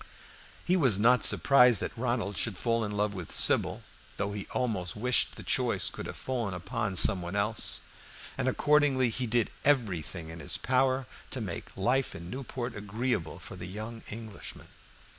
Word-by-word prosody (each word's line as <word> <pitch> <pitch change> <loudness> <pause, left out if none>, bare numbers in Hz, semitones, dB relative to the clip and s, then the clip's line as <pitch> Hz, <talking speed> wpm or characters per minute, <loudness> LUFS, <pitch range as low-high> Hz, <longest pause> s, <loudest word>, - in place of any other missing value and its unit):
He 180 - +2
was 130 - +4
not 125 +4 +4
surprised 125 -5 +6
that - - -4
Ronald 120 -4 -2
should 105 -2 -1
fall 115 +4 0
in 105 - -3
love 105 0 0
with 90 -4 -7
Sybil, - - +2 0.3
though 100 0 -2
he 100 -2 -6
almost 105 -9 -2
wished 125 +3 +2
the - - -10
choice - - +1
could - - -7
have - - -8
fallen 120 -7 -3
upon 95 +2 -3
some 95 0 +6
one 85 +3 -5
else, 105 +2 +2 0.5
and - - -2
accordingly 135 -2 +3
he 125 +2 -3
did 115 0 +1
everything 90 - 0
in 80 0 -9
his - - 0
power 130 +1 +1 0.2
to 130 - -3
make 95 -5 -7
life 125 +7 0
in 85 +1 -9
Newport 125 -1 -5
agreeable 105 -4 -3
for 90 +2 -10
the 90 -1 -8
young 110 +4 -7
Englishman. 110 -1 -8
110 Hz, 170 wpm, -29 LUFS, 95-125 Hz, 0.5 s, surprised